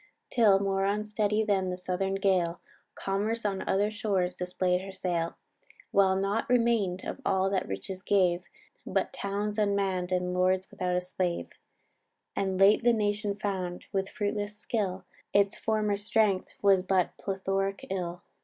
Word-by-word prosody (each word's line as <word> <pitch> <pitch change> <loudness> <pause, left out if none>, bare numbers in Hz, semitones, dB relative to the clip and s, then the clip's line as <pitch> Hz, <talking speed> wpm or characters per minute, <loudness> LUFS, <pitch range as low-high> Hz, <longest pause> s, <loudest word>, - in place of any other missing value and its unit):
Till, 215 -5 +5
more 195 -1 0
unsteady 210 +1 +1
then 195 -3 +1
the 180 - -3
southern 185 +1 -1
gale, 185 -3 +1 0.4
Commerce 210 +4 -2
on 195 -2 0
other 205 +2 +2
shores 195 -4 0
display'd 180 0 0
her 195 +1 -7
sail; 170 -3 -2 0.6
While 190 -1 +4
naught 195 +4 0
remain'd 230 -7 +2
of - - -5
all 190 0 +2
that 190 -2 0
riches 100 - -5
gave, 185 -3 +2 0.4
But - - -1
towns 205 +2 -2
unmann'd, 195 -3 0
and 180 0 0
lords 185 +1 +1
without 180 -1 -1
a 180 - +1
slave; 180 -1 -2 0.8
And 190 -1 -1
late 200 +4 +6
the 240 0 +5
nation 205 -1 0
found, 185 -4 -3
with 195 -1 -1
fruitless 205 0 -3
skill, 205 -4 -2 0.3
Its 200 0 +3
former 215 -2 0
strength 205 -2 +1
was 195 -2 +5
but 185 -1 +1
plethoric 195 0 -2
ill. 175 -2 -3
195 Hz, 145 wpm, -29 LUFS, 185-205 Hz, 0.8 s, late